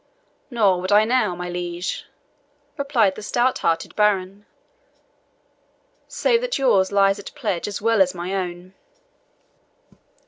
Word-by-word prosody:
"Nor 205 Hz, -8 st, +2 dB
would 185 Hz, +2 st, -3 dB
I 210 Hz, +1 st, +5 dB
now, 220 Hz, -6 st, +1 dB
my 180 Hz, 0 st, -6 dB
liege," 175 Hz, 0 st, -4 dB, 0.7 s
replied 265 Hz, -9 st, +1 dB
the 215 Hz, -, -9 dB
stout 240 Hz, +4 st, 0 dB
hearted 165 Hz, 0 st, -1 dB
baron, 200 Hz, -1 st, 0 dB, 1.6 s
"save 470 Hz, -1 st, +1 dB
that -, -, -2 dB
yours 205 Hz, -9 st, +2 dB
lies 195 Hz, 0 st, +3 dB
at 200 Hz, -, -10 dB
pledge 210 Hz, -, -2 dB
as 205 Hz, 0 st, -5 dB
well 225 Hz, -2 st, +3 dB
as 185 Hz, -1 st, +2 dB
my 175 Hz, +2 st, -4 dB
own." 180 Hz, -1 st, -5 dB
195 Hz, 130 wpm, -22 LUFS, 180-225 Hz, 1.6 s, I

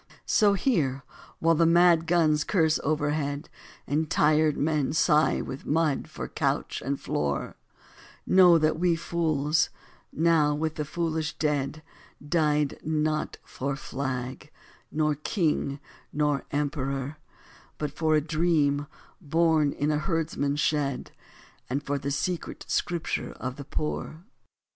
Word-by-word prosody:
So 205 Hz, -2 st, +4 dB
here, 155 Hz, -, 0 dB, 0.3 s
while 165 Hz, 0 st, +3 dB
the 165 Hz, +1 st, +3 dB
mad 170 Hz, -1 st, +5 dB
guns 155 Hz, -3 st, +3 dB
curse 160 Hz, -5 st, +2 dB
overhead, 150 Hz, 0 st, -1 dB, 0.3 s
And 150 Hz, +2 st, -1 dB
tired 155 Hz, 0 st, +3 dB
men 150 Hz, -2 st, 0 dB
sigh 155 Hz, 0 st, +3 dB
with 135 Hz, -, -7 dB
mud 155 Hz, -2 st, +1 dB
for -, -, -6 dB
couch -, -, -2 dB
and 140 Hz, +1 st, -2 dB
floor, 70 Hz, -1 st, -2 dB, 0.7 s
Know 180 Hz, -2 st, +7 dB
that 155 Hz, 0 st, +1 dB
we 175 Hz, -1 st, +3 dB
fools, 160 Hz, -2 st, 0 dB, 0.4 s
now 155 Hz, -2 st, +3 dB
with 155 Hz, +1 st, -1 dB
the 150 Hz, -1 st, -3 dB
foolish 160 Hz, -1 st, -2 dB
dead, 150 Hz, 0 st, -1 dB, 0.4 s
Died 150 Hz, -3 st, +1 dB
not 155 Hz, 0 st, -1 dB
for 140 Hz, +1 st, -4 dB
flag, 130 Hz, 0 st, -5 dB, 0.4 s
nor 155 Hz, 0 st, +1 dB
King, 150 Hz, -2 st, -1 dB, 0.3 s
nor 145 Hz, -1 st, 0 dB
Emperor, 140 Hz, -1 st, -2 dB, 0.6 s
But 150 Hz, -2 st, -3 dB
for 155 Hz, +1 st, +1 dB
a 150 Hz, -, +3 dB
dream, 150 Hz, -2 st, +1 dB, 0.3 s
born 160 Hz, -2 st, +2 dB
in 145 Hz, +2 st, -1 dB
a 150 Hz, -, +1 dB
herdsman's 155 Hz, -4 st, -1 dB
shed, 140 Hz, -4 st, -1 dB, 0.6 s
And 140 Hz, +3 st, -2 dB
for 140 Hz, 0 st, -2 dB
the 140 Hz, -, -3 dB
secret 155 Hz, +5 st, -3 dB
Scripture 170 Hz, -2 st, -2 dB
of 130 Hz, 0 st, -5 dB
the 140 Hz, -1 st, -8 dB
poor. 155 Hz, +2 st, -4 dB
150 Hz, 125 wpm, -27 LUFS, 145-160 Hz, 0.7 s, Know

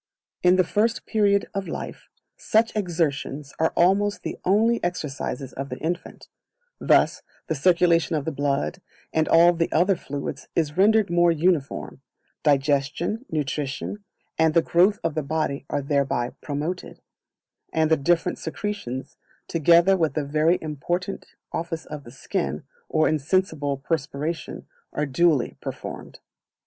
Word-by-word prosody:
In 180 Hz, 0 st, +5 dB
the 185 Hz, -, +4 dB
First 220 Hz, +6 st, 0 dB
Period 200 Hz, -2 st, +2 dB
of 195 Hz, -1 st, -3 dB
Life, -, -, -7 dB, 0.3 s
such 225 Hz, +1 st, +1 dB
exertions 155 Hz, -7 st, -2 dB
are 160 Hz, -, +2 dB
almost 200 Hz, +4 st, +3 dB
the -, -, -5 dB
only 225 Hz, +5 st, +3 dB
exercises 140 Hz, -6 st, -3 dB
of 135 Hz, +1 st, -5 dB
the -, -, -5 dB
infant; 170 Hz, +3 st, -4 dB, 0.5 s
thus -, -, +3 dB, 0.2 s
the -, -, -1 dB
circulation 170 Hz, +2 st, +3 dB
of 145 Hz, -2 st, -2 dB
the 160 Hz, -, -1 dB
blood, 140 Hz, -, -1 dB, 0.3 s
and 160 Hz, 0 st, +2 dB
all 170 Hz, +1 st, +6 dB
the 165 Hz, -1 st, -1 dB
other 185 Hz, +4 st, +3 dB
fluids, 140 Hz, -3 st, -6 dB
is 155 Hz, -3 st, 0 dB
rendered 210 Hz, +1 st, +4 dB
more 175 Hz, 0 st, +4 dB
uniform; 160 Hz, -5 st, 0 dB, 0.4 s
digestion, 150 Hz, -, +1 dB
nutrition, 150 Hz, +6 st, -3 dB, 0.4 s
and 160 Hz, -1 st, +3 dB
the 165 Hz, -, +5 dB
growth 190 Hz, +5 st, +4 dB
of 165 Hz, -, 0 dB
the 155 Hz, -, -1 dB
body 140 Hz, -1 st, -2 dB
are 145 Hz, -, -1 dB
thereby 140 Hz, -4 st, 0 dB
promoted; 155 Hz, +5 st, -4 dB, 0.7 s
and 160 Hz, 0 st, +1 dB
the -, -, +7 dB
different 165 Hz, +4 st, +1 dB
secretions, 160 Hz, -8 st, -5 dB, 0.3 s
together 170 Hz, +4 st, +5 dB
with 160 Hz, -4 st, 0 dB
the 150 Hz, -2 st, -1 dB
very 155 Hz, +4 st, +2 dB
important 175 Hz, +5 st, -3 dB, 0.3 s
office 165 Hz, -1 st, -3 dB
of 150 Hz, -2 st, -8 dB
the 120 Hz, -, -11 dB
skin, 165 Hz, +5 st, -3 dB, 0.3 s
or 155 Hz, 0 st, +3 dB
insensible 155 Hz, -2 st, 0 dB
perspiration, 150 Hz, +2 st, -3 dB, 0.3 s
are 150 Hz, -, 0 dB
duly 150 Hz, -1 st, +2 dB
performed. -, -, -7 dB
160 Hz, 135 wpm, -24 LUFS, 145-180 Hz, 0.7 s, the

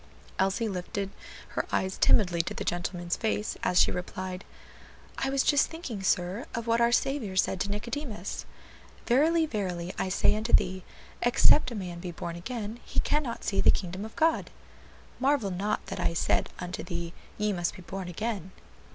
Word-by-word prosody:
Elsie 195 Hz, +4 st, +2 dB
lifted 195 Hz, +1 st, -3 dB, 0.4 s
her -, -, -2 dB
eyes 190 Hz, 0 st, 0 dB
timidly 175 Hz, -5 st, +5 dB
to 170 Hz, -, -5 dB
the -, -, -3 dB
gentleman's 175 Hz, 0 st, -1 dB
face 215 Hz, -2 st, -1 dB
as 180 Hz, 0 st, +3 dB
she -, -, +5 dB
replied, 185 Hz, +1 st, -4 dB, 0.8 s
"I 270 Hz, -, 0 dB
was 270 Hz, 0 st, +2 dB
just 290 Hz, -2 st, +4 dB
thinking, 305 Hz, -, -6 dB
sir, 190 Hz, +3 st, 0 dB
of 230 Hz, 0 st, -3 dB
what 230 Hz, 0 st, +2 dB
our 235 Hz, 0 st, +5 dB
Saviour 240 Hz, -6 st, +1 dB
said 190 Hz, 0 st, +2 dB
to 200 Hz, -, -1 dB
Nicodemus: 215 Hz, -, -4 dB, 0.6 s
'Verily, 315 Hz, +7 st, +4 dB
verily 185 Hz, -, -3 dB
I 190 Hz, -, 0 dB
say 200 Hz, -, +3 dB
unto 220 Hz, +2 st, -2 dB
thee, 185 Hz, 0 st, +4 dB, 0.4 s
except 250 Hz, +3 st, +5 dB
a 240 Hz, -, -6 dB
man 180 Hz, -4 st, -5 dB
be 180 Hz, 0 st, -5 dB
born 170 Hz, 0 st, -5 dB
again, 220 Hz, +4 st, -5 dB
he -, -, -2 dB
cannot 290 Hz, -6 st, 0 dB
see 195 Hz, -2 st, +1 dB
the -, -, +6 dB
kingdom 185 Hz, +1 st, 0 dB
of 220 Hz, -, -8 dB
God.' 320 Hz, +1 st, +2 dB, 0.7 s
'Marvel 265 Hz, -6 st, +2 dB
not 195 Hz, +4 st, -1 dB
that -, -, -5 dB
I 165 Hz, -, +1 dB
said -, -, +2 dB
unto 180 Hz, 0 st, -4 dB
thee, 170 Hz, -2 st, -4 dB, 0.2 s
Ye 210 Hz, -1 st, +1 dB
must 175 Hz, -2 st, -1 dB
be 180 Hz, -, -11 dB
born 190 Hz, +1 st, -5 dB
again.'" 190 Hz, 0 st, -3 dB
200 Hz, 175 wpm, -29 LUFS, 180-235 Hz, 0.8 s, the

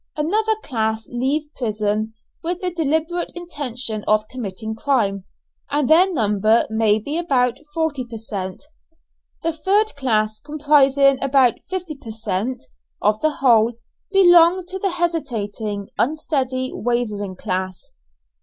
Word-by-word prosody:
Another 425 Hz, +9 st, +1 dB
class 220 Hz, -3 st, -2 dB
leave 285 Hz, +5 st, -1 dB
prison 215 Hz, -2 st, -1 dB, 0.3 s
with 350 Hz, +2 st, -2 dB
the 365 Hz, -1 st, -2 dB
deliberate 320 Hz, +2 st, -1 dB
intention 255 Hz, -10 st, -4 dB
of 215 Hz, 0 st, +2 dB
committing 220 Hz, -3 st, -5 dB
crime, 220 Hz, -6 st, 0 dB, 0.4 s
and 290 Hz, -2 st, +1 dB
their 355 Hz, +5 st, +5 dB
number 215 Hz, -, +2 dB
may 220 Hz, -1 st, +3 dB
be 285 Hz, +10 st, -3 dB
about 250 Hz, -8 st, +1 dB, 0.2 s
forty 320 Hz, -5 st, 0 dB
per 235 Hz, -2 st, -8 dB
cent. 195 Hz, -3 st, -5 dB, 0.8 s
The 330 Hz, 0 st, 0 dB
third 405 Hz, +5 st, +1 dB
class, 215 Hz, -6 st, 0 dB
comprising 280 Hz, -2 st, +3 dB
about 270 Hz, -3 st, +3 dB
fifty 360 Hz, -4 st, -4 dB
per 255 Hz, -5 st, -12 dB
cent. 220 Hz, +3 st, -2 dB, 0.4 s
of 210 Hz, +1 st, +1 dB
the 310 Hz, -, +3 dB
whole, 240 Hz, -5 st, +3 dB, 0.4 s
belong 350 Hz, -2 st, +6 dB
to 380 Hz, +1 st, -5 dB
the 390 Hz, -, 0 dB
hesitating, 225 Hz, -, -2 dB
unsteady, 260 Hz, -3 st, 0 dB
wavering 215 Hz, -5 st, -2 dB
class. 185 Hz, 0 st, -4 dB
255 Hz, 125 wpm, -21 LUFS, 215-315 Hz, 0.8 s, belong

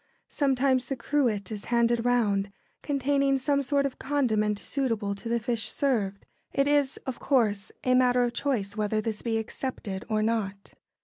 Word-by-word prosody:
Sometimes 265 Hz, -2 st, +2 dB
the 270 Hz, -, -2 dB
cruet 235 Hz, -7 st, 0 dB
is 210 Hz, -2 st, -6 dB
handed 235 Hz, -1 st, +2 dB
round, 205 Hz, -5 st, +1 dB, 0.3 s
containing 275 Hz, -1 st, +1 dB
some 280 Hz, +1 st, +1 dB
sort 280 Hz, +1 st, +1 dB
of 275 Hz, -, -4 dB
condiment 220 Hz, -7 st, +1 dB
suitable 225 Hz, -5 st, -1 dB
to 200 Hz, +4 st, -7 dB
the 235 Hz, 0 st, +1 dB
fish 225 Hz, -1 st, -2 dB
served. 210 Hz, -8 st, -1 dB, 0.3 s
It 275 Hz, 0 st, +1 dB
is, 290 Hz, -2 st, +2 dB
of 260 Hz, -3 st, -4 dB
course, 215 Hz, -7 st, +1 dB
a 255 Hz, -, +3 dB
matter 250 Hz, -1 st, +4 dB
of 240 Hz, -1 st, -1 dB
choice 215 Hz, -9 st, -1 dB
whether 215 Hz, 0 st, 0 dB
this 215 Hz, -1 st, -3 dB
be 225 Hz, -2 st, 0 dB
accepted 220 Hz, -4 st, -4 dB
or 215 Hz, -1 st, +1 dB
not. 205 Hz, -3 st, -2 dB
240 Hz, 165 wpm, -27 LUFS, 215-270 Hz, 0.3 s, matter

